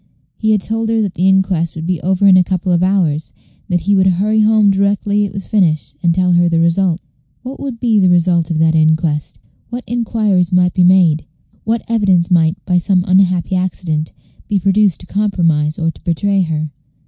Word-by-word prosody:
He 220 - -2
had 210 -2 +2
told 225 +2 -3
her 225 0 0
that 195 -3 -4
the 185 - 0
inquest 190 -3 0
would 160 0 -6
be 180 -2 -2
over 190 +3 0
in 195 -2 +6
a 185 - +5
couple 185 0 -2
of 175 -1 +1
hours, 180 -5 -1 0.4
and 180 - +1
that 175 - -8
he 200 0 +2
would 190 -1 +3
hurry 205 +4 +1
home 215 -1 +3
directly 200 +1 0
it 200 - -6
was 195 -1 -7
finished 170 -10 0
and 170 - +2
tell 180 +1 +1
her 175 0 +3
the 165 -1 0
result. 170 +1 +1 0.4
What 260 +2 -8
would 265 -5 -6
be 225 -3 +1
the 185 -2 +3
result 175 -2 +1
of 165 - -2
that 160 0 +2
inquest? 155 -1 0 0.3
What 245 +1 -6
inquiries 215 -6 -1
might 180 -1 +2
be 185 - +2
made? 175 -4 +3 0.4
what 225 +1 -1
evidence 195 -6 +1
might, 165 0 +2
by 180 -1 +1
some 180 +1 0
unhappy 185 -2 +1
accident, 170 -4 -3 0.4
be 205 - 0
produced 195 0 +1
to - - -12
compromise 170 -7 -1
or 165 0 -1
to - - -19
betray 195 +4 0
her? 155 -3 -3
185 Hz, 205 wpm, -15 LUFS, 170-200 Hz, 0.4 s, in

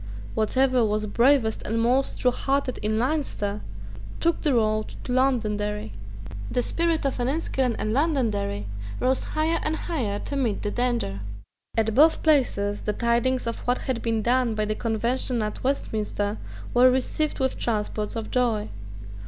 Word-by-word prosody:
Whatever 255 +3 +2
was 215 0 0
bravest 235 +1 +3
and 225 +2 -1
most 250 +4 +1
truehearted 265 +1 0
in 215 +1 0
Leinster 235 -6 -1 0.6
took 335 0 +1
the 295 -5 +2
road 215 -1 +1
to - - -5
Londonderry, 210 - 0 0.6
The 245 - 0
spirit 335 0 0
of 275 - -1
Enniskillen 260 -2 0
and 215 - -1
Londonderry 225 - 0 0.3
rose 255 +1 +2
higher 320 +2 0
and 310 +1 0
higher 250 -13 -2
to 280 - -5
meet 245 -7 0
the 205 - -1
danger. 240 - -1 0.6
At 220 -1 +2
both 310 +7 +5
places 245 -10 +2
the 210 - -1
tidings 240 +3 +1
of 230 - -3
what 245 +1 +3
had 255 -3 -3
been 225 -2 0
done 245 -1 +2
by 215 0 0
the 215 - -1
Convention 235 +2 -1
at 210 - -4
Westminster 215 -5 -1 0.3
were 250 +1 +7
received 265 +5 0
with 265 -1 0
transports 215 -1 -2
of 225 -1 -4
joy. 230 -4 +1
240 Hz, 150 wpm, -25 LUFS, 215-265 Hz, 0.6 s, were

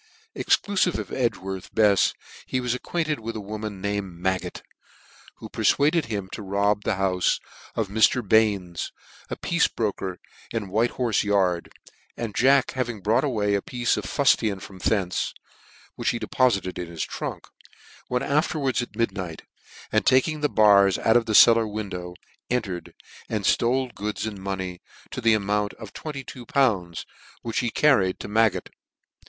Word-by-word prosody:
Exclufive 190 -3 +1
of - - -6
Edgworth 95 -7 -3
Befs 105 -3 +4 0.3
he 130 - -1
was 125 -1 -1
acquainted 155 +4 -2
with 115 +1 -5
a - - -3
woman 105 0 -6
named 100 -3 -3
Maggot, 95 +1 -2 0.7
who - - -9
perfuaded 155 +3 +2
him 100 -4 -3
to - - -6
rob 100 +1 0
the 105 - 0
houle 95 -1 0 0.5
of 110 -3 0
Mr, 110 +3 +3
Bain's, 100 -5 +2 0.4
a - - -3
piece 170 -1 +1
bro 110 -3 -1
ker 95 -2 -5 0.3
in 110 -4 -4
White 110 +5 +1
Horfe 120 -4 +1
Yard; 95 -4 +1 0.5
and 115 -3 -4
Jack 135 +1 +4
having 120 -5 -3
brought 110 +6 +2
away 105 -8 0
a 100 - +1
piece 120 +2 0
of - - -4
fullian 110 -8 +2
from 95 0 -11
thence, 95 -3 0 0.6
(which - - -1
he - - 0
depofited 110 -5 +1
jn 90 - -5
his 85 -1 -4
trunk; - - -5 0.6
went 125 +1 0
afterwards 145 -4 +1
at 120 -4 -7
midnight, 95 -7 -3 0.5
and - - +2
taking 150 +4 +3
the 150 - +2
bars 100 -3 +5
out 110 - +2
of 120 -1 +3
the 110 - +1
cel 115 - +9
lar 115 -1 +1
window, 95 -4 -5 0.3
entered, 105 -8 -3 0.3
and 105 -3 -2
Hole 125 +3 +2
goods 105 +1 -3
and 105 -3 -5
money 95 -2 -4 0.3
to 130 - -5
the 115 -2 +5
amount 105 0 -1
of 110 -3 -11
twenty 150 -4 -6
two 125 -2 -10
pounds 100 -11 +1 0.4
which 115 -2 -1
he 120 - 0
carried 110 -9 +3
to - - -6
Maggot. 110 +1 +2
110 Hz, 160 wpm, -25 LUFS, 95-125 Hz, 0.7 s, cel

